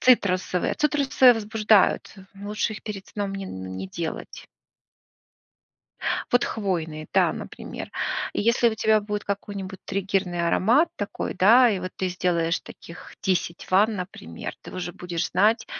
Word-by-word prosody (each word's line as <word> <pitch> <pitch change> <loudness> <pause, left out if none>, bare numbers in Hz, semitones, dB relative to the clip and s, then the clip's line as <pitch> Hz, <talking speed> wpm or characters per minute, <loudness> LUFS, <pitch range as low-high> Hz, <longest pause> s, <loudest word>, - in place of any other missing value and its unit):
Цитрусовые. 185 -7 +3
Цитрусы 280 -4 +4
возбуждают, 215 -2 +2 0.2
лучше 210 +2 -2
их - - -10
перед 200 -3 -6
сном 200 -1 -4
не, 195 -1 -5
н 95 - -7
не 95 - -4
делать. 165 - -6 1.9
Вот 245 - +4
хвойные, 165 -7 -3
да, - - +4
например. - - -7 0.4
Если 235 +2 +3
у 220 - -4
тебя 220 -1 +3
будет 210 0 -3
какой-нибудь 200 -1 -5
триггерный 190 -3 -1
аромат 240 - +4
такой, 205 - -4
да, 235 +6 +6
и 195 - -1
вот 185 0 -5
ты 185 - -1
сделаешь 175 -2 0
таких 170 - -12
10 180 -3 -1
ванн, 210 +4 +4
например, 180 - -6
ты - - -11
уже 180 -1 -4
будешь 175 -1 -3
знать, 215 +4 +3
195 Hz, 135 wpm, -25 LUFS, 180-215 Hz, 1.9 s, да